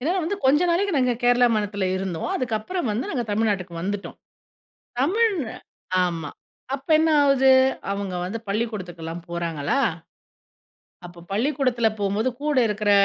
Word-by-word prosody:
ஏனா 310 +8 0
வந்து, 405 +5 -2
கொஞ்ச 295 +4 +5
நாளைக்கு 370 -1 +1
நாங்க 250 -1 +2
கேரளா 245 0 +5
மாநிலத்தில 205 -2 -1
இருந்தோம், 185 -4 -3
அதுக்கப்புறம் 250 +6 -2
வந்து 230 +5 -3
நாங்க 245 -3 -1
தமிழ்நாட்டுக்கு 200 -5 -1
வந்துட்டோம். 200 +1 -4 0.8
தமிழ் 415 - +3 0.7
ஆமா, 165 -4 -3 0.4
அப்போ 275 +3 -8
என்ன 320 0 +3
ஆவுது, 270 -1 +5 0.4
அவங்க 200 -2 -4
வந்து 225 +5 -4
பள்ளிக்கூடத்துக்குலாம் 180 -6 -4
போறாங்களா, 170 - -1 1.3
அப்போ 175 0 -13
பள்ளிக்கூடத்தில 250 -1 +1
போம்போது 205 +5 0
கூட 300 -2 0
இருக்கிற, 210 0 0
220 Hz, 125 wpm, -24 LUFS, 190-270 Hz, 1.3 s, கொஞ்ச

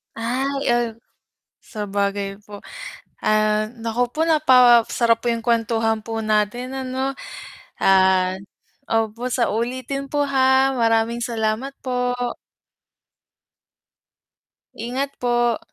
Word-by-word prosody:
Ay, 245 +4 -2 0.2
uhm, 240 -1 +1 0.7
sabagay 200 -2 -3
po. 205 -1 -10 0.6
Ah, 215 0 +2
naku 235 +2 -1
po, 310 - -5
napasarap 245 -5 +4
po 240 - +2
'yung 230 - -2
kuwentuhan 225 -1 0
po 225 -1 -4
natin, 215 +5 -1
ano. 265 +1 -3 0.6
Ah 190 -1 +3 0.5
opo 225 +2 -1
sa 245 -3 0
ulitin 255 +4 -3
po, 290 +1 0
ha. 265 -1 +3
Maraming 225 +1 +2
salamat 235 +3 -2
po. 250 -1 -1 2.6
Ingat 260 +5 -4
po. 240 -1 +1
235 Hz, 95 wpm, -21 LUFS, 215-255 Hz, 2.6 s, napasarap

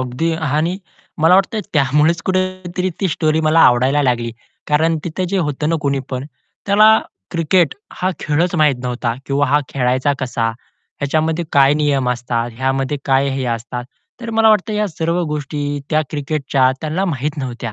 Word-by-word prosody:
अगदी 130 +6 -1 0.2
आणि 165 +6 0 0.4
मला 165 +3 +6
वाटतं 195 +3 +2
त्यामुळेच 150 +4 +2
कुठेतरी 185 -1 -1
ती 195 - +1
स्टोरी 155 -1 +1
मला 155 +1 +3
आवडायला 130 +4 +4
लागली 120 -3 0 0.4
कारण 160 +2 +2
तिथे 175 +2 -3
जे 195 - +1
होतं 150 -2 -1
ना 165 - +1
कुणीपण 135 -2 -2 0.4
त्याला 215 +2 +6 0.3
क्रिकेट 165 -1 +2 0.2
हा 185 - -1
खेळच 165 +4 0
माहीत 155 -4 +4
नव्हता 120 -1 -2
किंवा 140 +1 +1
हा 145 +3 +3
खेळायचा 130 +1 +1
कसा? 120 -3 -1 0.5
ह्याच्यामध्ये 155 +4 0
काय 140 -1 +5
नियम 145 -4 +1
असतात? 120 -1 -2
ह्यामध्ये 135 +2 -1
काय 135 0 +2
हे 135 -1 -2
असतात? 120 +2 -6 0.4
तर 235 -1 -5
मला 225 0 +4
वाटतं 215 0 +3
या 210 0 0
सर्व 170 +1 -1
गोष्टी 145 -1 -3
त्या 155 0 +2
क्रिकेटच्या 140 -3 +1
त्यांना 160 +5 -1
माहीत 150 -3 -2
नव्हत्या. 120 -5 -5
150 Hz, 155 wpm, -18 LUFS, 135-170 Hz, 0.5 s, मला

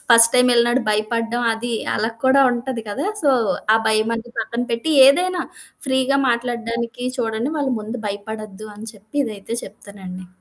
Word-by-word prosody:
First 230 0 +7
time 250 0 +5
వెళ్ళినప్పుడు 240 +1 +3
భయపడడం 230 +3 -1
అది 235 +2 -4 0.2
అలా 220 +2 0
కూడా 270 +1 +5
ఉంటది 245 -1 -4
గదా! 280 - -3 0.2
సో 290 - +4 0.5
ఆ - - +2
భయం 220 +1 +2
అని 235 +1 -9
పక్కన 240 +1 -3
పెట్టి 235 +8 -1 0.2
ఏదైనా 360 +6 +3 0.4
ఫ్రీగా 265 +1 +2
మాట్లాడడానికి 235 0 -2
చూడండి 230 +4 -1
వాళ్ళ 280 -2 0
ముందు 220 +4 -6
భయపడొద్దు 215 0 -7
అని 220 +2 -8
చెప్పి 210 +6 -13
ఇదైతే 215 +1 -6
చెప్తానండి. 185 -3 -10
235 Hz, 150 wpm, -20 LUFS, 215-250 Hz, 0.5 s, First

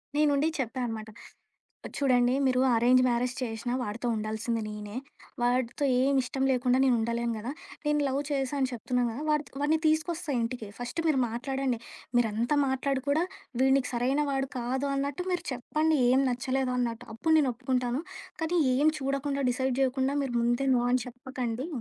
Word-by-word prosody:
నేనుండి 295 0 +3
చెప్పా 260 -1 -3
అనమాట. 220 -2 -5 0.9
చూడండి 250 -3 +3
మీరు 255 -1 +3 0.2
అరేంజ్ 250 +2 +5
మ్యారేజ్ 245 +1 0
చేశినా 240 0 -3
వాడితో 230 +2 -4
ఉండాల్సింది 220 +2 -2
నేనే, 210 0 -7 0.5
వాడితో 245 +2 +1 0.2
ఏం 275 +2 +3
ఇష్టం 265 +2 -2
లేకుండా 250 0 +2
నేను 260 -2 +4
ఉండలేను 235 +1 -1
గదా! 235 +5 -4 0.3
నేను 295 0 +2
లవ్ 270 +1 0
చేశా 275 -1 -1
అని 260 -1 +1
చెప్తున్నాను 245 +1 0
కదా! 260 +6 -5
వాడ్ 300 0 +2 0.2
వాడిని 300 +2 +2
తీసుకొస్తా 315 +1 0
ఇంటికి 230 -2 -3
ఫస్ట్ 245 +6 -3
మీరు 285 -4 +3
మాట్లాడండి. 260 +1 -2 0.4
మీరంత 230 +2 +1 0.2
మాట్లాడి 265 0 -1
కూడా, 305 +4 +3 0.4
వీడు 265 0 +5
నీకు 265 -2 -1
సరైన 255 +4 +1
వాడు 270 -1 -1
కాదు 260 +3 -1
అన్నట్టు 280 +5 -2
మీరు 355 - -1
చెప్పండి 305 +5 0
ఏం 260 +2 +4
నచ్చలేదు 255 +1 -1
అన్నట్టు, 240 -1 -2
అప్పుడు 320 +8 +2
నేను 280 -4 +3
ఒప్పుకుంటాను. 255 +1 -1 0.4
కానీ 340 +2 +1 0.2
ఏం 290 +3 +3
చూడకుండా, 275 +1 -1
డిసైడ్ 260 +1 0
చేయకుండా 265 +1 +1
మీరు 265 -3 -3
ముందే 240 +3 +1
నో 240 - +2
అని 255 - +3
చెప్పకండి 250 0 -4
255 Hz, 160 wpm, -28 LUFS, 240-275 Hz, 0.9 s, అరేంజ్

